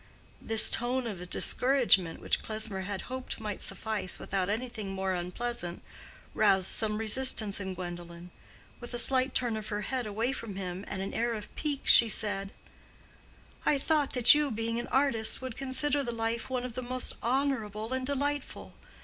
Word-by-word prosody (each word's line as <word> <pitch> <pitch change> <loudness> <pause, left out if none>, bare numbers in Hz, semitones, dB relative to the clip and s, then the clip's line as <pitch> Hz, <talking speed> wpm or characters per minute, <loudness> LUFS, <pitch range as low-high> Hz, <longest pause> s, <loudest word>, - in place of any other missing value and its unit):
This 225 -1 +5
tone 245 +2 0
of 180 -6 -6
discouragement, 240 -12 +3
which - - +2
Klesmer 215 -3 -3
had 200 0 -4
hoped 260 -1 -5
might 210 -2 -5
suffice 200 -1 -2
without 190 -1 -2
anything 225 -1 -3
more 190 0 -2
unpleasant, 180 +1 -4 0.5
roused 190 -1 +3
some 215 -1 +2
resistance 220 -2 +2
in 190 -2 -5
Gwendolen. 175 -1 -8 0.5
With 240 0 -7
a - - -2
slight 260 +2 +3
turn 240 -3 0
of 215 0 -5
her 210 -1 -3
head 250 +2 -3
away 225 +5 -1
from 230 -7 -6
him, 185 0 -5
and 190 -1 -4
an 195 - -5
air 235 0 -1
of 210 -1 -9
pique, 290 -3 -2
she 230 - +8
said, 195 -1 0 1.1
"I 290 - +3
thought 295 0 0
that 250 -2 +7
you, 295 -1 +1
being 230 0 -2
an 240 - -5
artist, 265 -5 +2
would 260 -3 -6
consider 275 +2 0
the 240 - -3
life 230 +1 -3
one 250 -1 -2
of 250 - -6
the 255 - -4
most 255 +1 -2
honorable 235 -4 -1
and 260 0 -2
delightful. 285 +1 -3
225 Hz, 170 wpm, -29 LUFS, 195-255 Hz, 1.1 s, she